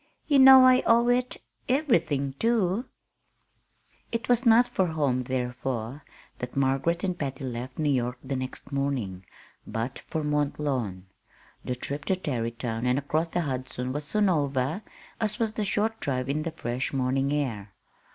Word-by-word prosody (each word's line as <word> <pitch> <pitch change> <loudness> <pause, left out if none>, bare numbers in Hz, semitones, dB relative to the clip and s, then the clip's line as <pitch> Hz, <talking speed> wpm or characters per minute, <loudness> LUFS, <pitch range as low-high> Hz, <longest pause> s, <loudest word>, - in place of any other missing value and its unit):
You 285 -3 +4
know 265 -1 +10
I 255 0 +6
owe 235 +1 +5
it 250 +1 +1 0.3
everything, 170 - +1
too." 225 -1 +1 1.3
It 230 -1 -3
was 245 0 +3
not 235 +2 +6
for 190 -5 0
home, 140 -6 0
therefore, 125 +1 -3 0.4
that 125 +2 -6
Margaret 140 +6 +1
and 185 -2 0
Patty 135 -1 -4
left 125 0 -5
New 150 -2 +1
York 125 -1 0
the 135 0 -3
next 130 +2 -6
morning, 130 -10 -2 0.4
but 115 +4 -3
for 160 -1 -4
Mont 150 -1 0
Lawn. 120 -11 -2 0.6
The 125 - -2
trip 140 +3 -5
to 190 - +2
Tarrytown 115 -6 -3
and 125 +1 +2
across 155 +4 0
the 175 +1 -1
Hudson 130 -3 -4
was 145 +1 -3
soon 210 +6 +1
over, 145 0 0 0.4
as 215 -1 -1
was 220 -2 -1
the 215 - -2
short 215 +2 0
drive 130 -3 -2
in 150 +2 0
the 165 +1 -3
fresh 120 -2 -3
morning 135 +1 0
air. 115 -9 -2
140 Hz, 160 wpm, -27 LUFS, 130-190 Hz, 1.3 s, know